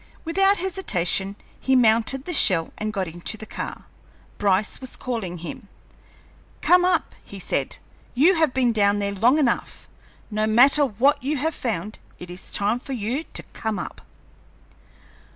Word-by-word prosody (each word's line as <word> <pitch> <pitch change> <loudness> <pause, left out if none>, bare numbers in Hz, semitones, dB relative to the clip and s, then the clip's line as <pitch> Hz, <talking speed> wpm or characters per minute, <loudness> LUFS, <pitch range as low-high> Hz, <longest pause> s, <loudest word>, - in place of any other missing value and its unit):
Without 390 +4 +3
hesitation 200 - -2 0.2
he 265 - +2
mounted 240 +3 +3
the 355 - -4
shell 180 - +3
and 215 0 -2
got 195 -4 -2
into 175 +6 -6
the 220 - -8
car. - - -7 0.5
Bryce 200 +3 +1
was 260 - -6
calling 220 -8 -4
him. 205 +7 -8 0.9
"Come 360 0 +5
up," 360 -3 +1
he - - -10
said. - - -2 0.4
"You 310 +9 +5
have 320 -5 +2
been 250 -2 +2
down 205 -1 +3
there 200 -1 -1
long 235 +8 +3
enough. 270 -6 -1 0.4
No 215 +1 0
matter 265 +7 +5
what 255 +6 +2
you 285 +4 -1
have 315 +4 -1
found, 215 - -4 0.2
it 180 0 -10
is 180 - -10
time 210 +4 0
for 270 - -7
you 250 +7 -2
to - - 0
come 220 -1 -3
up." - - -7
230 Hz, 155 wpm, -23 LUFS, 200-280 Hz, 0.9 s, Come